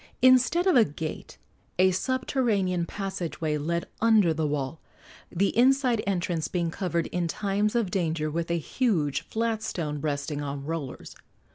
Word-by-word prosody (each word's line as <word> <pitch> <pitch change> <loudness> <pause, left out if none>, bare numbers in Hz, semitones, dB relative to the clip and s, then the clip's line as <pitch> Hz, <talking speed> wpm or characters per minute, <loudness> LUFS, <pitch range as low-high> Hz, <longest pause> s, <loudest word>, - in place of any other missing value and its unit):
Instead 255 +7 +5
of 375 - +4
a 240 - +7
gate, 155 -2 -6 0.4
a 185 +1 +5
subterranean 205 -6 0
passage 190 -4 -4
way 155 -2 0
led 170 +3 -1 0.2
under 215 -7 +5
the 155 -1 -1
wall, 145 +1 -3 0.5
the 195 +3 0
inside 250 -1 +4
entrance 175 -4 -1
being 170 -2 -1
covered 170 -3 -1
in 175 -1 -1
times 205 +4 -1
of 225 -6 +1
danger 160 -4 0
with 170 +2 -2
a 170 - +1
huge 165 - 0
flat 225 -1 -2
stone 150 -9 -3
resting 145 0 -2
on 140 -1 -5
rollers. 155 -4 -5
175 Hz, 150 wpm, -27 LUFS, 155-220 Hz, 0.5 s, a